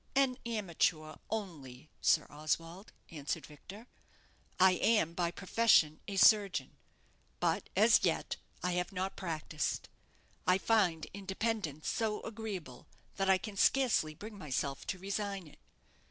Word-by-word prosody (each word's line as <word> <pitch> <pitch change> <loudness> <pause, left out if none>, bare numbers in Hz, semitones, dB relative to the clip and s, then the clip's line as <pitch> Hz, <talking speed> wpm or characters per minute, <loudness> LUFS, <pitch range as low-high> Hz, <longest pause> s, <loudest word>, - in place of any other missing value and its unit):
"An 270 -2 +3
amateur 170 -7 -1
only, 155 - -6
Sir 155 - +4
Oswald," 165 +6 -3 0.2
answered 150 -3 -4
Victor. 195 +9 -12 0.7
"I 185 0 +7
am 185 -3 +2
by 170 0 0
profession 180 -4 +3
a 200 - -4
surgeon; 195 - +4 0.6
but - - 0
as - - +5
yet - - 0 0.3
I 180 - +1
have 180 +1 -1
not 190 0 -3
practised. 155 -4 -3 0.6
I 185 - +5
find 190 -7 +2
independence 195 -5 -3
so 220 -2 0
agreeable 205 - -6 0.3
that 195 -1 +1
I 190 - +6
can 210 +1 -8
scarcely 215 -9 +3
bring 210 +4 -9
myself 140 -3 -3
to 185 - -2
resign 195 0 -3
it. 150 - -17
185 Hz, 125 wpm, -33 LUFS, 155-210 Hz, 0.7 s, I